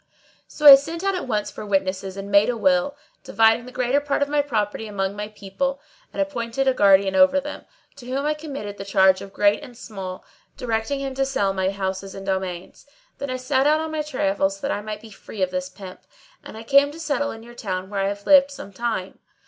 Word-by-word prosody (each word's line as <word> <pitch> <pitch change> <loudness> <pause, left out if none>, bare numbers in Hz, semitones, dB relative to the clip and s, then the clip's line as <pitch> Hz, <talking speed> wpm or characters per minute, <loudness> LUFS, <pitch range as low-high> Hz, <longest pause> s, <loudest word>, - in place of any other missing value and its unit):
So 300 - -6
I 285 - +14
sent 320 +6 +2
out 390 0 +1
at 365 - -4
once 210 -3 -1
for - - -8
witnesses 190 -1 -2
and 200 +1 -7
made 200 +3 +5
a 245 - -1
will, 280 +3 +1 0.3
dividing 225 +2 +3
the - - -9
greater 250 +2 +1
part 285 0 0
of 285 - -4
my 295 0 +2
property 220 -5 -2
among 195 -1 -2
my 210 0 -4
people, 215 +7 -4 0.3
and - - -8
appointed 270 -2 -1
a 265 - +4
guardian 195 -3 +4
over 280 0 +5
them, 295 +1 -8 0.3
to 250 -3 -12
whom 270 +3 -2
I 300 - +2
committed 280 -10 -7
the - - -4
charge 190 -1 +3
of 195 - -9
great 205 +3 +2
and 250 -5 -12
small, 195 -6 -8 0.3
directing 240 +3 -2
him 270 -1 -4
to 270 +1 0
sell 235 -8 0
my 190 0 0
houses 195 0 -4
and 195 - -8
domains. 190 +2 -4 0.3
Then 280 - -4
I 255 - -2
set 260 +2 +1
out 305 +1 +4
on 320 0 -4
my 310 -1 -1
travels 195 -9 -1
that - - -2
I 205 - -2
might 215 0 -6
be 225 - -13
free 200 0 -6
of 185 - -1
this 185 0 -3
pimp;[FN#631] 185 0 -11 0.4
and - - -9
I 225 - -8
came 280 +4 +4
to 305 +3 -11
settle 285 -3 -1
in 225 -3 -8
your 240 +1 -13
town 190 -4 -5
where 200 - -2
I 195 - +1
have 200 0 -5
lived 280 -1 +6
some 275 -8 -10
time. 220 -4 -3
225 Hz, 230 wpm, -23 LUFS, 195-280 Hz, 0.4 s, I